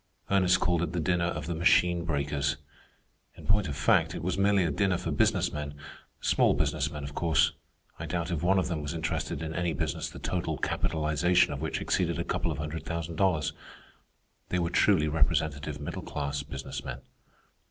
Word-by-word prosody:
Ernest 95 -2 +4
called 90 -2 +1
it 85 -1 -2
the 90 - 0
dinner 85 +1 +1
of 75 -3 -3
the 85 - -2
Machine 85 +1 +3
Breakers. 75 -2 0 0.8
In - - -12
point 100 -2 +2
of 70 -2 -4
fact, 70 - +3
it - - -5
was 90 +1 0
merely 100 0 +3
a 80 - 0
dinner 90 +5 +1
for 85 - -3
business 70 - +2
men—small 75 -1 -1
business - - 0
men, 75 -1 -6
of 70 +1 -6
course. 80 -1 +3 0.5
I - - -5
doubt 85 0 -2
if 80 -3 -1
one 95 +3 +3
of 95 - +1
them 80 -3 -2
was 75 +3 -4
interested 80 0 -2
in 80 0 -4
any 85 -1 0
business - - -2
the - - -11
total 80 -4 -2
capitalization 80 +4 +1
of 70 - -6
which 80 - -2
exceeded - - 0
a - - -1
couple - - -1
of - - -4
hundred 75 +1 -4
thousand 85 -1 -4
dollars. 90 -5 +2 1.0
They 90 - 0
were 85 -1 0
truly 90 -4 +4
representative 75 -1 0
middle - - -5
class 70 -1 -3
business 70 -1 -6
men. - - -6
80 Hz, 190 wpm, -29 LUFS, 75-90 Hz, 1.0 s, Ernest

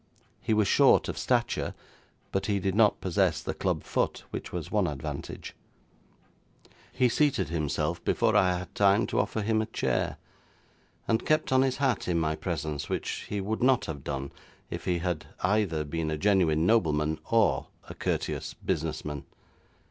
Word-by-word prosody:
He 110 - +1
was 105 -2 +3
short - - +5
of - - -3
stature, - - 0 0.6
but 95 +1 -1
he 100 -1 +1
did 95 0 -1
not 105 0 +4
possess 90 -3 +1
the - - -4
club - - -1
foot, - - -1
which - - -5
was 85 -3 -5
one 105 -4 +2
advantage. 70 -4 -6 1.4
He 130 -1 +3
seated 125 - +1
himself 75 -4 -1
before - - +2
I 90 -1 +4
had 90 0 -8
time 100 +2 +4
to - - -1
offer 105 +1 -1
him 110 +1 +2
a 110 - -3
chair, - - -1 0.9
and 110 -1 +1
kept 155 -2 +1
on 130 0 +5
his 130 -1 +1
hat 135 -6 0
in 90 -2 +1
my 80 -1 0
presence, 75 -3 -3
which - - -3
he 105 - -2
would 110 +3 -2
not 130 0 +4
have 70 -4 -6
done 70 0 -4 0.4
if - - -5
he 90 -1 +1
had 85 -2 -3
either 95 -5 +1
been 80 +1 -3
a 80 - -1
genuine 85 -4 +3
nobleman 80 -8 +2
or 115 -2 +3 0.2
a - - -7
courteous - - -2
business 80 0 -2
man. 75 -2 -4
90 Hz, 170 wpm, -28 LUFS, 80-110 Hz, 1.4 s, short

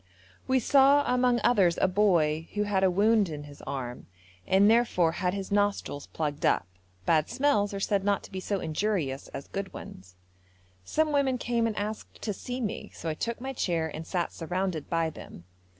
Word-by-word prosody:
We 260 0 +3
saw 275 +3 +5
among 250 -1 +2
others 190 -8 +4
a - - +4
boy 170 -5 +2
who 210 - +1
had 200 -2 0
a 190 - +5
wound 205 +1 +3
in 150 -2 -6
his 145 -1 -12
arm, 125 -3 -5 0.4
and 195 +2 +5
therefore 220 -7 +3
had 180 +2 -1
his 195 -1 -5
nostrils 205 -8 0
plugged 150 -2 -3
up; - - +3 0.4
bad 155 -2 +2
smells 260 -8 +2
are 200 - -4
said 195 0 0
not 200 0 +1
to - - -12
be 190 - -4
so 200 +1 -2
injurious 160 -5 -1
as 135 - -8
good 195 -1 -5
ones. 95 0 -11 0.7
Some 310 - 0
women 275 -3 +2
came 235 -1 0
and 215 - -4
asked 210 +1 -5
to 210 - -1
see 250 +6 -5
me, 215 -2 -4
so 165 - -4
I - - 0
took 230 +9 -3
my 265 +2 -5
chair 165 -9 -1
and 160 +1 -7
sat 175 -3 -2
surrounded 175 -2 -3
by 165 -1 0
them. 85 - -11
195 Hz, 190 wpm, -28 LUFS, 165-225 Hz, 0.7 s, saw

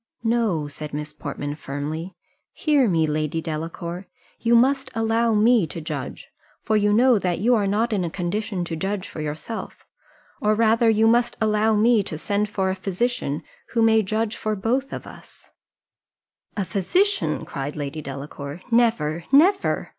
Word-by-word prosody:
"No," 225 -10 +1
said 150 0 -7
Miss 150 0 -4
Portman, 145 -1 -5
firmly. 155 +4 -5 0.4
"Hear 290 -6 +2
me, 165 -3 +2
Lady 155 +1 -1
Delacour 165 +3 -5 0.3
you 235 0 +3
must 265 +3 +3
allow 225 0 +2
me 220 -3 +4
to 165 - -7
judge, 155 - -6 0.4
for 220 - +1
you 210 -1 +3
know 240 +1 +5
that 180 -2 -1
you 235 +7 +3
are 210 -4 +2
not 220 +4 +1
in 195 -3 0
a 170 - -2
condition 185 +2 -3
to 165 - -4
judge 195 +3 -3
for 155 - -7
yourself, 155 +9 -6 0.6
or 210 0 +3
rather 225 +1 +4
you 220 0 +3
must 240 +1 +2
allow 215 0 +2
me 225 +1 +4
to 160 -5 -5
send 205 +5 -1
for 190 -2 0
a - - -2
physician, 195 - -2 0.3
who 230 -1 +3
may 220 0 +5
judge 215 +2 -1
for 215 - -2
us 205 - -5
both." 255 +6 -4 1.1
"A 200 - 0
physician!" 360 - +1
cried 140 +1 -5
Lady 145 +1 -4
Delacour, 140 +2 -7
"Never 195 -9 +2
never. 370 +8 +3
205 Hz, 160 wpm, -23 LUFS, 160-230 Hz, 1.1 s, know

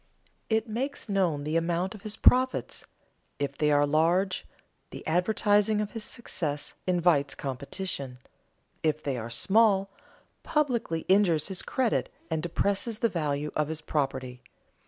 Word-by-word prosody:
It 220 +1 +1
makes 255 +6 -3
known 180 -7 +1
the 155 +2 -2
amount 170 +4 0
of 210 - -11
his 215 +1 -3
profits; 255 +1 +3 0.5
if 140 -1 -2
they 150 +1 +1
are 145 0 +4
large, 170 +6 +1 0.4
the - - -9
advertising 205 +4 +2
of 210 -1 -2
his 225 -2 -6
success 160 -11 -4
invites 170 -6 +2
competition; 140 0 -4 0.6
if 155 -1 0
they 140 -2 -1
are 115 -1 -5
small, 195 - +3 0.5
publicity 240 - 0
injures 185 -5 +3
his 190 -1 -3
credit 255 -4 0 0.2
and 160 -1 0
depresses 200 +6 -1
the 230 - +1
value 150 -4 -2
of 150 -1 +1
his 160 0 -4
property. 130 -4 -2
175 Hz, 135 wpm, -28 LUFS, 150-210 Hz, 0.6 s, are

